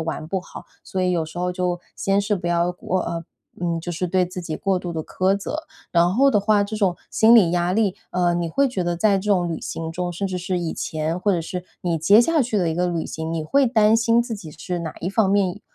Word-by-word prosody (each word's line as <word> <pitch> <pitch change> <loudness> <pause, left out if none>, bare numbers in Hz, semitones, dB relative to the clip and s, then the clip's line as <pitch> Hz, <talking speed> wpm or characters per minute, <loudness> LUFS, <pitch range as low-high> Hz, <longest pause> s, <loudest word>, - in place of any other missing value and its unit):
玩 160 -1 -4
不 190 +3 -2
好， - - -11 0.2
所 185 - -3
以 180 - +2
有 175 -2 +1
时 160 +2 -9
候 180 0 -1
就 180 -1 -1 0.2
先 195 0 +1
是 205 +1 +1
不 180 -3 -5
要 170 0 +1
唔 185 - -1
呃， 170 -2 -2 0.4
嗯， 170 -1 -1
就 175 +1 -5
是 180 +2 -2
对 185 +1 +2
自 180 +1 -6
己 160 -3 -4
过 195 -2 0
度 180 -1 -5
地 160 - -2
苛 190 +2 +1
责。 305 +10 -5 0.3
然 175 +1 +3
后 275 +4 +5
的 210 - +3
话， 205 0 +3
这 205 +2 -6
种 195 -5 +1
心 225 +1 +5
理 200 -8 +6
压 175 +1 +1
力 210 -4 +2 0.2
呃， 175 -1 +1
你 170 -1 -1
会 275 +11 +2
觉 245 -8 -2
得 175 0 -1
在 200 +1 +3
这 205 +2 -2
种 180 -3 +3
旅 165 - -4
行 165 0 -5
中， 180 +1 -3
甚 175 +3 -3
至 185 -1 -3
是 180 0 -2
以 170 -2 -2
前 155 +2 -3
或 205 - +2
者 180 - +1
是 180 +2 -5 0.2
你 170 -2 0
接 200 +8 +6
下 320 +6 +4
去 235 -4 0
的 175 -4 +1
一 160 - -2
个 180 +1 +1
旅 170 -2 -2
行， 160 0 -5
你 165 -1 -2
会 275 - +3
担 220 -3 +4
心 230 +1 +3
自 235 -1 -5
己 190 -7 -9
是 175 +4 -5
哪 165 -2 -5
一 180 - -2
方 205 -1 +2
面 200 -1 +1
180 Hz, 285 characters per minute, -22 LUFS, 170-205 Hz, 0.4 s, 理